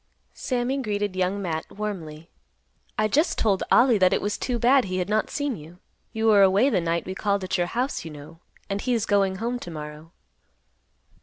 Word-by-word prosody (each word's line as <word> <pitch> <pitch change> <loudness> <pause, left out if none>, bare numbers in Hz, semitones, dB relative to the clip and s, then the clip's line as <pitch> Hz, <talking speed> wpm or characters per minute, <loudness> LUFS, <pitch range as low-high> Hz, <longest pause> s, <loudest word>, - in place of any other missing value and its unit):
Sammy 255 +1 -1
greeted 205 -4 -2
Young 185 +2 0
Matt 160 -3 -4
warmly. 170 -6 -6 0.7
"I 215 - +2
just 300 - +1
told 200 -4 +1
Ollie 240 -3 +5
that 185 -1 +4
it - - +2
was 205 0 -1
too 250 -2 -2
bad 250 +2 +4
he 185 -1 -3
had 180 +1 -2
not 215 0 +1
seen 285 -3 -2
you. 165 +1 -12 0.3
You 225 -1 -2
were 210 -2 +6
away 200 +8 +4
the 190 - +2
night 170 0 -1
we 185 - -4
called 200 0 -1
at 185 - -2
your 175 -1 +1
house, 250 +8 -2
you 165 - -7
know; 150 +2 -12 0.3
and 200 0 -3
he 250 -1 0
is 225 -2 0
going 195 -2 +2
home 235 +5 -3
to 175 - -8
morrow." 150 0 -8
200 Hz, 205 wpm, -25 LUFS, 175-230 Hz, 0.7 s, were